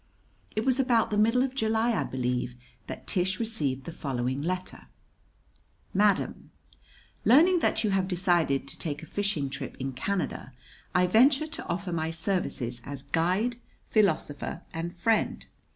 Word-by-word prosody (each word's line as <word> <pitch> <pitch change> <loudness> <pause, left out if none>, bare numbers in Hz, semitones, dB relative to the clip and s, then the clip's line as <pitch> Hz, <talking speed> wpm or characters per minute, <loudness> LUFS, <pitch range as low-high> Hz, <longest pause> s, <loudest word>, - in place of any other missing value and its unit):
It 215 +2 0
was 265 0 +3
about 240 -5 +3
the - - +1
middle 230 +4 +4
of 265 -1 -2
July, 225 -1 +1
I 225 - +1
believe, 125 -1 -2 0.3
that - - -7
Tish 190 -1 0
received 150 - -1
the 170 - -6
following 130 -3 -2
letter: 180 +3 -4 1.1
Madam: 200 0 +1 0.7
Learning 340 +9 +6
that 225 -7 +1
you 210 - +1
have 190 -1 +1
decided 175 -7 +1
to 135 - -5
take 150 -1 -4
a - - -7
fishing 200 -5 -1
trip 135 0 -6
in 135 0 -3
Canada, 135 -2 -3 0.4
I 180 0 +5
venture 265 - +5
to 310 0 -6
offer 180 +2 -3
my 160 -1 -1
services 165 - -1
as 140 +1 -7
guide, 185 - +1 0.3
philosopher, 170 -5 0
and 165 +1 -3
friend. 220 +6 0
180 Hz, 150 wpm, -28 LUFS, 145-220 Hz, 1.1 s, Learning